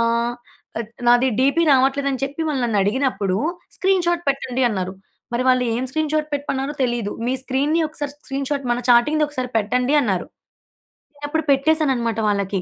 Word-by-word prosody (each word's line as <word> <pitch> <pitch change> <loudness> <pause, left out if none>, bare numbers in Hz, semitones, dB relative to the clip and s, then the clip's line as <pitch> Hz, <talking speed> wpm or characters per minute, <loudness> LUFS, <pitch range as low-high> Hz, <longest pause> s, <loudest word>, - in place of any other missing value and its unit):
ఆహ్, 235 +1 +1 0.4
అడ్ 225 -2 -4 0.2
నాది 245 +2 +5
డీపీ 280 +6 +3
రావట్లేదని 270 0 +2
చెప్పి 285 +4 -4
వాళ్ళు 270 -4 -1
నన్నడిగినప్పుడు 210 -2 0 0.4
స్క్రీన్‌షాట్ 345 -3 +1
పెట్టండి 265 -2 -1
అన్నారు. 190 -4 -3 0.4
మరి 240 +1 0
వాళ్ళు 255 -1 +4
ఏం 245 - -1
స్క్రీన్‌షాట్ 310 +1 -1
పెట్టమన్నారో 280 0 -2
తెలీదు. 240 -4 -1 0.2
మీ 250 - +1
స్క్రీన్‌ని 280 +5 0
ఒకసారి 290 -2 -5
స్క్రీన్‌షాట్ 275 0 -3
మన 240 - +1
చాటింగ్‌‌ది 295 +6 +4
ఒకసారి 255 -4 -4
పెట్టండి 250 +6 +1
అన్నారు. 195 -9 -1 0.9
నేనప్పుడు 290 +2 -3
పెట్టేసానన్నమాట 270 -6 +1
వాళ్ళకి. 200 -2 -1
265 Hz, 140 wpm, -21 LUFS, 235-290 Hz, 0.9 s, నాది